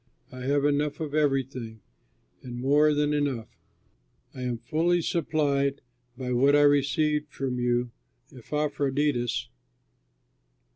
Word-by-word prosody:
I 130 - -9
have 140 +1 +2
enough 145 0 0
of 155 -3 -4
everything, 135 -6 -1 0.6
and 120 -1 -8
more 145 +4 +4
than 150 0 +1
enough. 140 -6 -2 0.7
I 130 - -8
am 125 -2 -2
fully 160 +9 +1
supplied 145 -4 0 0.4
by 125 -1 -4
what 135 +4 +4
I 145 - +5
received 150 +1 +2
from 130 -2 -3
you 120 0 0 0.4
through 130 - -14
Epaphroditus. 140 -3 -1
140 Hz, 115 wpm, -27 LUFS, 125-150 Hz, 0.7 s, I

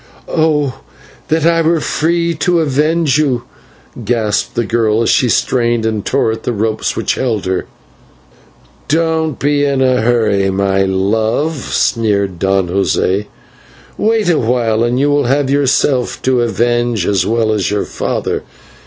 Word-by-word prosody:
"Oh! 150 -4 0 0.5
that 160 0 +1
I 165 0 +3
were 165 0 +2
free 170 +2 0
to 170 +2 +1
avenge 155 +1 +1
you!" 130 -6 0 0.6
gasped 110 -4 -1
the 120 - 0
girl 110 +1 +1
as - - +2
she 125 - +2
strained 120 -1 +1
and 110 -2 -1
tore 130 -4 0
at 110 0 -5
the 120 - -2
ropes 110 0 -1
which - - -1
held 115 -6 -2
her. 95 0 -2 1.2
"Don't 160 -1 0
be 145 0 +1
in 140 -2 +1
a 130 -2 +2
hurry, 110 -4 +1
my 95 0 0
love," 110 +10 0
sneered 105 - -1
Don 95 0 +1
José, 100 +1 0 0.7
"wait 220 -1 +1
a 170 -3 +3
while 115 -1 +1
and 120 +2 0
you 145 +1 +2
will 145 -1 +2
have 135 +2 +1
yourself 135 -2 +1
to 130 -2 +2
avenge 120 -3 0
as 95 -2 +1
well 110 0 +1
as 105 -4 0
your 105 0 -1
father. - - -3
120 Hz, 150 wpm, -15 LUFS, 110-145 Hz, 1.2 s, I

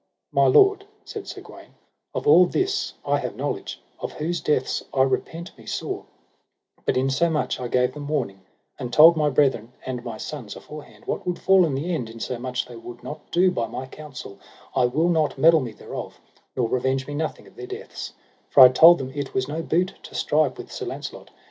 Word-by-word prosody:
My - - +4
lord, 400 -2 +5 0.2
said 425 -3 -7
Sir - - -7
Gawaine, - - -14 0.4
of - - -3
all 180 - +7
this 390 - -1
I - - +2
have - - -4
knowledge, - - -4 0.2
of - - -5
whose 165 +3 -3
deaths 130 -4 0
I 130 - +3
repent 160 +6 -2
me - - -15
sore; - - -4 0.8
but - - +2
insomuch 135 +5 +1
I 125 - -3
gave 125 +1 +1
them 145 -1 -7
warning, 125 -11 -2 0.4
and 125 -3 -5
told 160 +5 +8
my 150 -2 +2
brethren 130 -4 +1
and 125 -2 -4
my 115 -3 -6
sons 125 -4 -7
aforehand 150 0 -12
what - - -4
would 180 - -1
fall 190 -2 +5
in 140 - -2
the 165 +6 -2
end, 125 -8 -3
insomuch 125 +2 -4
they 120 - -11
would 120 +1 -10
not 150 - -8
do 180 +1 +3
by 115 -10 -2
my 130 - -6
counsel, 130 -7 -10 0.4
I 125 - +4
will 150 +8 +1
not 160 -5 +1
meddle 160 +3 +6
me 120 -3 -5
thereof, 110 - -8 0.4
nor 125 -3 +1
revenge 130 +2 0
me 145 - -7
nothing 155 +2 -3
of - - -18
their 380 - -8
deaths; 400 +4 -7 0.4
for 140 - +6
I 130 - +12
told 165 +7 +8
them 130 -1 -5
it 140 -2 -5
was 130 0 0
no 155 +3 -3
boot 180 +3 0
to - - -12
strive 150 -3 +1
with - - -9
Sir - - -5
Launcelot. - - -7
145 Hz, 200 wpm, -24 LUFS, 125-165 Hz, 0.8 s, I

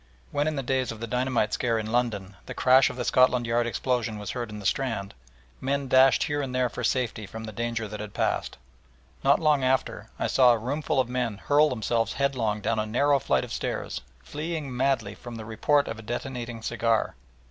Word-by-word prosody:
When 145 +1 0
in 155 - -1
the 135 - -2
days 130 0 0
of 115 - -8
the 115 - -3
dynamite 125 -1 0
scare 115 -2 +1
in 110 0 -3
London 105 -5 -1
the - - -6
crash 130 +1 +5
of - - -7
the 125 -1 -3
Scotland 125 -1 +4
Yard 120 +1 +1
explosion 120 -2 -1
was 105 -2 -5
heard 120 -2 -4
in 105 - -7
the 100 - -9
Strand, 115 -4 -1 0.5
men 140 +1 -1
dashed 130 +1 +5
here 145 -1 -1
and 130 -2 -4
there 125 -1 +2
for 125 - -6
safety 115 -3 -1
from 110 +3 -8
the 110 - -6
danger 115 0 -3
that 105 +1 -7
had 105 -1 -7
passed. - - -1 0.7
Not - - +5
long 150 -4 +3
after 130 +1 0
I - - -1
saw 125 -2 +5
a - - +1
roomful 135 +5 -1
of 130 - +2
men 125 -4 -2
hurl 145 +7 +3
themselves 115 -2 0
headlong 120 -7 0
down 110 +1 0
a 110 - -1
narrow 140 +5 +3
flight 70 - +1
of - - -6
stairs, 65 - -3 0.2
fleeing 150 - -4
madly 135 +2 0
from 120 -1 -9
the 110 -1 -7
report 140 +6 +2
of 115 - -5
a - - -7
detonating 120 0 -5
cigar! 115 -1 0
120 Hz, 210 wpm, -26 LUFS, 110-130 Hz, 0.7 s, crash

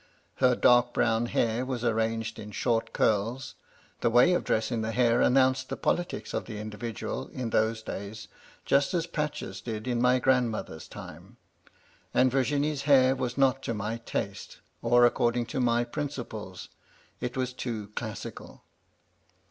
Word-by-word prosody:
Her 125 -1 +4
dark 120 0 +4
brown 115 0 +2
hair 115 +1 0
was 130 -2 -3
arranged 115 0 -1
in 105 - -8
short 115 0 0
curls 115 +5 0 0.2
— - - -32
the 120 - +3
way 125 +10 +5
of 175 - +1
dressing 110 +1 0
the 110 +1 -2
hair 120 -1 +3
announced 130 0 +3
the - - -3
politics 175 0 -2
of - - -2
the 110 - -7
individual, 110 +1 -5
in 120 -3 -5
those 110 0 +1
days, 100 +1 -7 0.4
just 140 +5 +2
as 165 -2 +1
patches 150 -3 -4
did 110 -1 -5
in 120 -1 0
my 125 +1 +4
grandmother's 120 -10 0
time; - - -11 0.8
and 130 0 +4
Virginie's 140 +2 0
hair 130 -1 +6
was 125 -1 -3
not 135 -1 +3
to 115 - -3
my 105 +2 -3
taste, 115 - -5 0.2
or 120 0 +5
according 120 0 +2
to 135 +3 -4
my 120 -1 +2
principles; 120 - -6 0.5
it 125 +1 -4
was 130 -1 -1
too 110 -5 -5
classical. 110 0 -7
120 Hz, 155 wpm, -28 LUFS, 110-130 Hz, 0.8 s, hair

